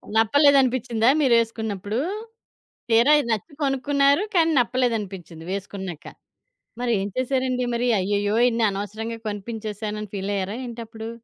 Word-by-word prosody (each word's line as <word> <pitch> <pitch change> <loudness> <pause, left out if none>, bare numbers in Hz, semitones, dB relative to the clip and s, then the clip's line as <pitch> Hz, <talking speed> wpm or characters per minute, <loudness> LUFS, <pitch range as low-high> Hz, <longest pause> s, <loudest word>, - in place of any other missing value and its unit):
నప్పలేదనిపించిందా 255 -1 +4
మీరేసుకున్నప్పుడు? 225 -4 +1 0.9
తీరా 235 +6 +5
ఇది 235 - -4
నచ్చి 225 - -3
కొనుక్కున్నారు. 280 +4 +2
కాని, 330 -2 +4
నప్పలేదనిపించింది 205 -10 -2
వేసుకున్నాక. 190 -4 -6 0.7
మరి 245 -1 0
ఏం 195 - -2
చేశారండి 255 -1 0
మరి? 240 +1 0
అయ్యయ్యో! 205 +2 0
ఇన్ని 230 0 0
అనవసరంగా 215 +3 -5
కొనిపించసేనని 210 0 -5
ఫీలాయ్యారా 195 +1 -2
ఏంటప్పుడు? 225 -1 -7
225 Hz, 100 wpm, -23 LUFS, 205-255 Hz, 0.9 s, తీరా